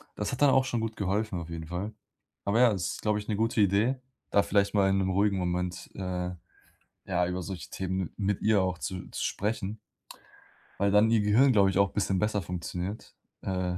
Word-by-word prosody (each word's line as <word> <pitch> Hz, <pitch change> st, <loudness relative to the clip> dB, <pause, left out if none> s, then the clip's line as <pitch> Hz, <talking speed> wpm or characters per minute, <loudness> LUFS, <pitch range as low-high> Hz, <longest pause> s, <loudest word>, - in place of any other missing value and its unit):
das 105 Hz, -, -2 dB
hat 130 Hz, -, -5 dB
dann 145 Hz, -, +7 dB
auch 130 Hz, 0 st, +4 dB
schon 120 Hz, -2 st, -1 dB
gut 110 Hz, 0 st, -3 dB
geholfen 100 Hz, 0 st, -1 dB
auf 85 Hz, -1 st, -7 dB
jeden 80 Hz, -1 st, -6 dB
Fall. 90 Hz, +6 st, -4 dB, 0.5 s
Aber 100 Hz, +3 st, +2 dB
ja, 125 Hz, -2 st, +6 dB
das 90 Hz, -4 st, -3 dB
glaube 105 Hz, -1 st, +1 dB
ich, 105 Hz, -, -9 dB
'ne 105 Hz, -, +1 dB
gute 115 Hz, 0 st, +1 dB
Idee, 100 Hz, +6 st, +3 dB, 0.4 s
da 100 Hz, -, +4 dB
vielleicht 100 Hz, -1 st, +1 dB
mal 100 Hz, -1 st, +4 dB
in 95 Hz, -, +2 dB
'nem 95 Hz, -1 st, 0 dB
ruhigen 100 Hz, +1 st, +2 dB
Moment, 90 Hz, 0 st, -2 dB
äh, 90 Hz, -1 st, -3 dB, 0.8 s
ja, 90 Hz, -2 st, +1 dB
über 90 Hz, 0 st, -3 dB
solche 90 Hz, 0 st, -6 dB
Themen 95 Hz, -2 st, -3 dB
mit 100 Hz, -1 st, -1 dB
ihr 105 Hz, -3 st, +4 dB
auch 90 Hz, -1 st, -1 dB
zu 90 Hz, +1 st, -5 dB
zu -, -, -3 dB
sprechen 105 Hz, 0 st, -2 dB, 1.0 s
weil 100 Hz, 0 st, +3 dB
dann 105 Hz, +2 st, +5 dB
ihr 115 Hz, -1 st, +4 dB
Gehirn, 115 Hz, +7 st, +5 dB
glaube 100 Hz, -4 st, +5 dB
ich 95 Hz, -, 0 dB
auch 100 Hz, 0 st, +3 dB
bisschen 95 Hz, -2 st, 0 dB
besser 105 Hz, 0 st, 0 dB
funktioniert, 90 Hz, +3 st, -5 dB, 0.3 s
äh, 90 Hz, -1 st, -1 dB
100 Hz, 205 wpm, -29 LUFS, 90-105 Hz, 1.0 s, dann